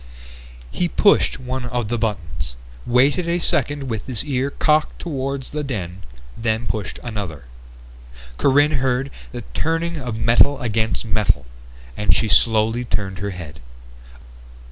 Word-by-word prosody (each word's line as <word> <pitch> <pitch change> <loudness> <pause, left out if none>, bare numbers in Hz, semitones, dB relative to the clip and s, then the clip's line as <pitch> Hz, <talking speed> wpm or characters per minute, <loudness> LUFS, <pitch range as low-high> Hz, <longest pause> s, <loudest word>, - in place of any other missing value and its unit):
He 175 - 0
pushed 200 -2 +3
one 130 0 -4
of 120 -2 -2
the 120 +2 -1
buttons, 85 - -3 0.3
waited 140 +8 +3
a 170 - +2
second 145 -4 0
with 115 -5 -4
his 125 -1 -2
ear 135 -1 0
cocked 155 +1 +2
toward 140 -4 -3
the 150 +3 -4
den, 95 -9 -4 0.3
then 110 0 -1
pushed 100 -3 -3
another. 100 - -5 1.0
Corinne 145 +1 +4
heard 135 +1 0 0.2
the 120 -2 -6
turning 165 +1 0
of 125 -6 -4
metal 120 +5 +4
against 110 0 -1
metal, 105 - +1 0.5
and 105 - +3
she 115 - +1
slowly 110 +3 +3
turned 95 -5 -2
her 100 +1 -2
head. 80 -7 -8
120 Hz, 135 wpm, -21 LUFS, 105-140 Hz, 1.0 s, Corinne